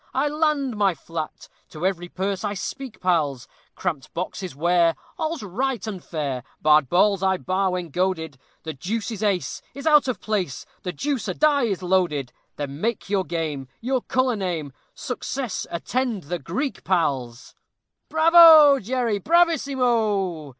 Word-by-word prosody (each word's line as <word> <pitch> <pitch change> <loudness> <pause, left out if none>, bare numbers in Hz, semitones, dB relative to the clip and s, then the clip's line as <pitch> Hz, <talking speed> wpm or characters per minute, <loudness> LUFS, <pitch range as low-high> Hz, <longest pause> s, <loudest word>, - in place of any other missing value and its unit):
I 280 +3 +2
land 300 -5 0
my 200 -4 +2
flat! 160 -1 -6 0.2
To 155 +3 -5
every 175 -2 -1
purse 195 +2 -3
I 205 -1 -2
speak, 260 +4 -6
pals. 150 -8 0 0.3
Cramped 160 -7 -3
boxes 180 -2 -4
'ware, 170 +2 +3 0.2
all's 315 -4 -2
right 235 +4 -2
and 195 -5 -6
fair, 140 -6 -3 0.2
Barred 150 -3 +4
balls 195 +3 +3
I 190 -1 +2
bar 190 +1 0
when 180 -2 -3
goaded; 160 -5 -1 0.2
The 160 - -5
deuce 210 - -3
an 220 -1 -5
ace 185 -3 -3
is 280 +2 -8
out 300 -3 +5
of 245 -7 -2
place! 195 -10 -2 0.2
The 180 - -3
deuce 275 +3 -2
a 185 - -2
die 290 -4 +3
is 195 -5 -2
loaded! 175 -8 0 0.2
Then 145 +1 -6
make 225 -3 -2
your 195 -2 +2
game, 155 -6 -3
Your 255 +2 -1
color 255 -1 +1
name; 170 -8 -3 0.2
Success 250 -2 -4
attend 230 +3 -2
the 175 +4 -4
Greek, 215 - -4
pals. 135 -9 -1 0.6
"Bravo, 320 -3 +8
Jerry 235 -1 -1
bravissimo!" 240 - +1
190 Hz, 150 wpm, -23 LUFS, 170-255 Hz, 0.6 s, Bravo